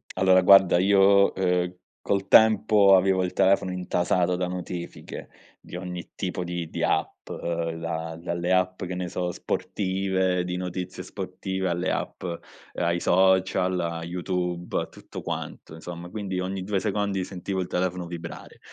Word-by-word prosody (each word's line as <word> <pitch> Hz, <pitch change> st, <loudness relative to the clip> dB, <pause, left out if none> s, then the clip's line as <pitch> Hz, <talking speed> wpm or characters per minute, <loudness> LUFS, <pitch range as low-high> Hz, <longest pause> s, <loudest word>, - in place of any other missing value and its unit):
Allora, 95 Hz, 0 st, +5 dB
guarda, 95 Hz, -1 st, +7 dB
io, 100 Hz, +1 st, +5 dB
ehm, 90 Hz, -1 st, +1 dB, 0.3 s
col 100 Hz, -1 st, -1 dB
tempo 105 Hz, -3 st, +6 dB
avevo 95 Hz, 0 st, +2 dB
il 90 Hz, -, -2 dB
telefono 95 Hz, -1 st, +2 dB
intasato 90 Hz, 0 st, 0 dB
da 90 Hz, 0 st, -1 dB
notifiche 90 Hz, -1 st, -7 dB, 0.3 s
di -, -, -11 dB
ogni 90 Hz, -1 st, -7 dB
tipo 90 Hz, -1 st, -3 dB
di 85 Hz, -2 st, -4 dB
di -, -, -4 dB
app, -, -, -1 dB
ehm, 85 Hz, -1 st, -3 dB
da 80 Hz, 0 st, -4 dB
dalle 85 Hz, +1 st, -2 dB
app, 95 Hz, 0 st, +1 dB
che 90 Hz, 0 st, -4 dB
ne 90 Hz, 0 st, -3 dB
so, 90 Hz, 0 st, -2 dB
sportive, 95 Hz, -1 st, -1 dB
di 90 Hz, 0 st, -3 dB
notizie 90 Hz, 0 st, -5 dB
sportive, 95 Hz, 0 st, -4 dB
alle 90 Hz, +2 st, -1 dB
app -, -, -4 dB
ehm, 85 Hz, -2 st, -4 dB, 0.4 s
ai 85 Hz, 0 st, +1 dB
social, 95 Hz, 0 st, +3 dB
a 85 Hz, -1 st, -3 dB
YouTube, 90 Hz, 0 st, -2 dB
a -, -, -5 dB
tutto -, -, -10 dB
quanto, 80 Hz, -, -6 dB
insomma. 85 Hz, +1 st, -8 dB
Quindi 95 Hz, -3 st, -4 dB
ogni 95 Hz, 0 st, -3 dB
2 100 Hz, -1 st, 0 dB
secondi 100 Hz, -1 st, -1 dB
sentivo 95 Hz, +1 st, -4 dB
il 90 Hz, -, -4 dB
telefono 90 Hz, 0 st, -1 dB
vibrare 85 Hz, -1 st, -8 dB
90 Hz, 155 wpm, -26 LUFS, 90-95 Hz, 0.4 s, guarda